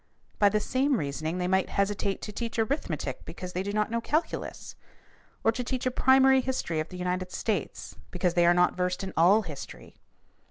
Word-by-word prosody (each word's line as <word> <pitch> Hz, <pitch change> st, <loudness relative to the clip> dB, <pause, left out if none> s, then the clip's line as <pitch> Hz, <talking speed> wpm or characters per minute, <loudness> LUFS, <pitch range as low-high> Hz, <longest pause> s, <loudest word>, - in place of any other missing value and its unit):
By 205 Hz, -, +6 dB
the 210 Hz, -, +1 dB
same 260 Hz, +4 st, +1 dB
reasoning 155 Hz, +2 st, -3 dB
they 180 Hz, 0 st, -1 dB
might 190 Hz, +1 st, +1 dB
hesitate 200 Hz, 0 st, -1 dB
to 210 Hz, -, -5 dB
teach 230 Hz, +2 st, -5 dB
arithmetic 230 Hz, +7 st, -2 dB
because 180 Hz, -1 st, -8 dB
they 180 Hz, -, -1 dB
do 200 Hz, +1 st, -3 dB
not 210 Hz, +1 st, 0 dB
know 230 Hz, 0 st, 0 dB
calculus 310 Hz, +7 st, -3 dB, 0.7 s
or 225 Hz, -, +4 dB
to 250 Hz, +2 st, -4 dB
teach 255 Hz, +1 st, -3 dB
a 255 Hz, -, +1 dB
primary 265 Hz, +1 st, +5 dB
history 250 Hz, -11 st, -2 dB
of 155 Hz, -, -3 dB
the 180 Hz, -, -8 dB
United 180 Hz, 0 st, -2 dB
States 205 Hz, -9 st, -3 dB
because 180 Hz, -1 st, 0 dB
they 175 Hz, -1 st, +4 dB
are 175 Hz, -, +6 dB
not 180 Hz, 0 st, +3 dB
versed 180 Hz, +1 st, -1 dB
in 190 Hz, -, -5 dB
all 190 Hz, +7 st, +5 dB
history. 150 Hz, -6 st, -9 dB
200 Hz, 195 wpm, -28 LUFS, 180-235 Hz, 0.7 s, By